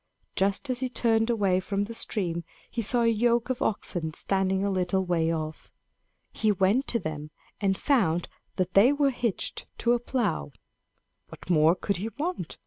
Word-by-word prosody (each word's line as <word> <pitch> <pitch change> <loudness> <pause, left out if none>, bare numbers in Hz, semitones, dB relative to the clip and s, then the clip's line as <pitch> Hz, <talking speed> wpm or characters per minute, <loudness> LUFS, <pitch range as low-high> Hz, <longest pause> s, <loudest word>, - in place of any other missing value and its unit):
Just 195 +7 +1
as 250 - -1
he 260 0 -1
turned 225 -2 +2
away 200 -6 +2
from 195 +1 -1
the 220 +3 -6
stream, 175 -7 -2 0.3
he 235 - -2
saw 235 +2 +1
a - - +3
yoke 235 +2 +2
of 255 - -4
oxen 170 -6 -1
standing 190 0 +1
a 200 - 0
little 185 0 0
way 165 -2 +1
off. 155 -1 -5 0.6
He 215 - +2
went 200 +7 +2
to 235 - +1
them 150 -6 -5 0.3
and 195 -2 +1
found 180 - +1 0.3
that 185 -1 -1
they 215 +7 +6
were 285 -1 +2
hitched 240 -5 -3
to 240 - +2
a 240 - +2
plow. 230 - -2 0.8
What - - -7
more 160 +1 +5
could 200 +1 -2
he 210 +5 -3
want? 345 +5 -3
200 Hz, 175 wpm, -27 LUFS, 180-235 Hz, 0.8 s, they